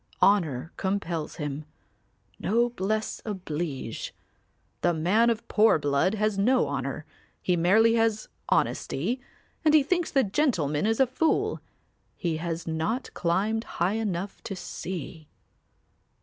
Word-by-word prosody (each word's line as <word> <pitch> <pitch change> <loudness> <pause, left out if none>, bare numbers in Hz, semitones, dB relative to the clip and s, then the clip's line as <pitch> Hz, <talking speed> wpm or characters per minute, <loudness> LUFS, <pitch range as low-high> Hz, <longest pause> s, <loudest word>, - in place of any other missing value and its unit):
Honour 165 -8 +3
compels 180 -5 -2
him, 150 -1 -4 0.7
'noblesse 220 -1 0
oblige.' 160 - -4 0.7
The 175 -1 +2
man 200 +9 +3
of 230 -1 -2
poor 220 -4 +5
blood 145 +7 +1
has 210 -1 0
no 250 +6 +3
honour; - - -3 0.3
he 180 - +1
merely 210 +7 +5
has 225 -2 +1 0.2
honesty 220 - 0 0.4
and 310 -1 +5
he 300 - +6
thinks 350 +3 0
the 270 -1 +3
gentleman 190 - +1
is 225 0 +1
a 265 - +6
fool. 260 +6 0 0.5
He 165 -3 -1
has 165 0 -3
not 165 +11 -2
climbed 200 +6 0
high 175 +4 +2
enough 195 -2 -3
to 195 - -4
see. 170 -4 -6
195 Hz, 120 wpm, -27 LUFS, 165-225 Hz, 0.7 s, he